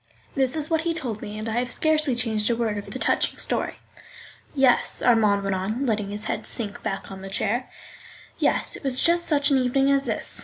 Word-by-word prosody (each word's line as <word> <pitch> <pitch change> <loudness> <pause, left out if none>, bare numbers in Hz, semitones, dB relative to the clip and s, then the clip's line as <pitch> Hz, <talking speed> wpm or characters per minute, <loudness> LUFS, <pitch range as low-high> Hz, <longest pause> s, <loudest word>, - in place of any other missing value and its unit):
This 265 0 +1
is 305 -1 +2
what 320 -1 +2
he 330 0 -2
told 240 -10 -4
me, 210 +1 -7
and 215 +1 -5
I 225 +1 -1
have 250 0 -2
scarcely 310 -4 +2
changed 220 -3 0
a 235 - +2
word 225 -2 -1
of 200 0 -10
the - - -6
touching - - 0
story. - - -1 0.8
Yes 265 -3 +3
(Armand 215 -4 +3
went 195 0 -1
on, 215 +8 -2
letting 210 -4 -1
his 205 +1 -3
head - - -3
sink 210 -4 -2
back 195 -2 -5
on 190 0 -9
the 195 - -8
chair), 240 +6 -1 0.7
yes, - - +1
it - - -9
was 265 -2 +3
just 340 0 +3
such 290 -2 +2
an 270 - +4
evening 270 +2 +2
as 275 0 +3
this. - - -1
240 Hz, 220 wpm, -24 LUFS, 210-275 Hz, 0.8 s, an